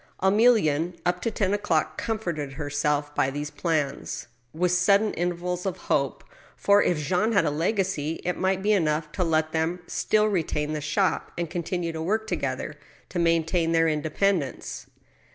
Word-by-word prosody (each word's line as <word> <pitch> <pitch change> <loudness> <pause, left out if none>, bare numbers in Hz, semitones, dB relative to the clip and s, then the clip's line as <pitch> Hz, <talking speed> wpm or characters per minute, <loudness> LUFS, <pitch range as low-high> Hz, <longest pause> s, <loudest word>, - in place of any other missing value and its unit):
Emilienne, 190 -6 +3
up 175 - 0
to 230 - 0
ten 200 -3 0
o'clock, 165 -6 0
comforted 175 -11 -3
herself 145 0 -1
by 135 - +2
these 145 +2 -4
plans, 155 -5 -2 0.3
with 175 +4 0
sudden 200 +4 +3
intervals 180 +1 -2
of 190 -2 -2
hope, - - -1 0.3
for, 200 0 +4
if 175 - +2
Jean 180 +9 +1
had 200 - +4
a - - +1
legacy, 165 -1 0
it 180 - 0
mig^t 190 0 0
be 210 - +3
enough 155 -4 +1
to 185 - -1
let 160 -1 +1
them 165 +2 0
still 215 +3 +1
retain 160 -6 -1
the 150 - -3
shop, 155 +6 0
and 170 -2 -3
continue 175 0 -2
to 160 -1 -5
work 215 +6 0
to 220 - -1
gether - - -3 0.4
to 180 - -3
maintain 165 0 +2
their 165 0 +4
independence. 155 0 -1
170 Hz, 165 wpm, -26 LUFS, 155-190 Hz, 0.4 s, for